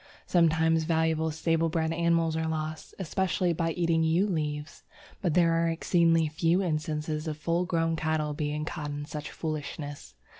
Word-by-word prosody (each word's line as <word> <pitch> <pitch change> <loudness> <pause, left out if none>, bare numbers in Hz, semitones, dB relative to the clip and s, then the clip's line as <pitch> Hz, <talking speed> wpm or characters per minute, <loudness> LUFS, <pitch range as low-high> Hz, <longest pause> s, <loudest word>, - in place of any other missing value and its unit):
Sometimes 160 -1 +3
valuable 160 -1 +1
stable 165 +1 +1
bred 160 0 0
animals 165 -1 +2
are 160 0 -1
lost, 155 0 -4
especially 185 -1 0
by 165 0 0
eating 165 -1 +1
yew 165 +4 +3
leaves, 150 -4 -3 0.4
but 175 -6 0
there 170 -2 +4
are 165 0 +2
exceedingly 165 -1 +3
few 165 +5 +1
instances 155 -1 -2
of 155 -1 -3
full 170 +3 0
grown 165 -1 +1
cattle 155 -1 -1
being 150 +1 -2
caught 155 -2 -4
in 145 0 -4
such 150 0 -6
foolishness. 150 -2 -5
160 Hz, 155 wpm, -28 LUFS, 155-170 Hz, 0.4 s, there